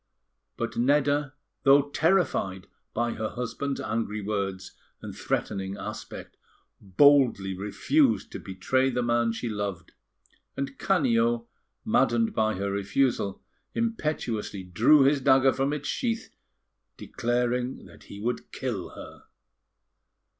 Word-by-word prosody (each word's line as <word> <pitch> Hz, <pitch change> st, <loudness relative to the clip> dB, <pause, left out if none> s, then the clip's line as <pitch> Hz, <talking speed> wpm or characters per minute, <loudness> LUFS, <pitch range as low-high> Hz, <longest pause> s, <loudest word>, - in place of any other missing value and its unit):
But -, -, -4 dB
Nedda, 145 Hz, +2 st, +2 dB, 0.3 s
though 140 Hz, +1 st, +5 dB
terrified 155 Hz, -, +1 dB, 0.3 s
by 120 Hz, +1 st, -1 dB
her 110 Hz, 0 st, -3 dB
husband's 135 Hz, +3 st, -4 dB
angry 110 Hz, -1 st, -2 dB
words 100 Hz, -2 st, -3 dB, 0.3 s
and -, -, -8 dB
threatening 95 Hz, 0 st, -3 dB
aspect, -, -, -8 dB, 0.4 s
boldly 110 Hz, -2 st, +4 dB
refused 110 Hz, +3 st, +1 dB
to -, -, -6 dB
betray 130 Hz, +8 st, 0 dB
the 125 Hz, -1 st, -1 dB
man 120 Hz, -1 st, +2 dB
she 115 Hz, +2 st, -4 dB
loved; 100 Hz, -6 st, -4 dB, 0.7 s
and 140 Hz, 0 st, -4 dB
Canio, 120 Hz, -9 st, +2 dB, 0.4 s
maddened 115 Hz, -1 st, +2 dB
by 110 Hz, 0 st, +1 dB
her 100 Hz, +1 st, -2 dB
refusal, 100 Hz, +1 st, 0 dB, 0.3 s
impetuously 150 Hz, -, -2 dB
drew 115 Hz, -, +5 dB
his 140 Hz, +1 st, +3 dB
dagger 135 Hz, 0 st, +5 dB
from 135 Hz, +1 st, 0 dB
its 150 Hz, 0 st, -4 dB
sheath, 230 Hz, -2 st, -2 dB, 0.7 s
declaring 125 Hz, +1 st, -2 dB
that -, -, -16 dB
he 100 Hz, -, -10 dB
would 120 Hz, +3 st, -3 dB
kill 115 Hz, -9 st, -4 dB
her. -, -, -11 dB
120 Hz, 115 wpm, -27 LUFS, 100-140 Hz, 0.7 s, though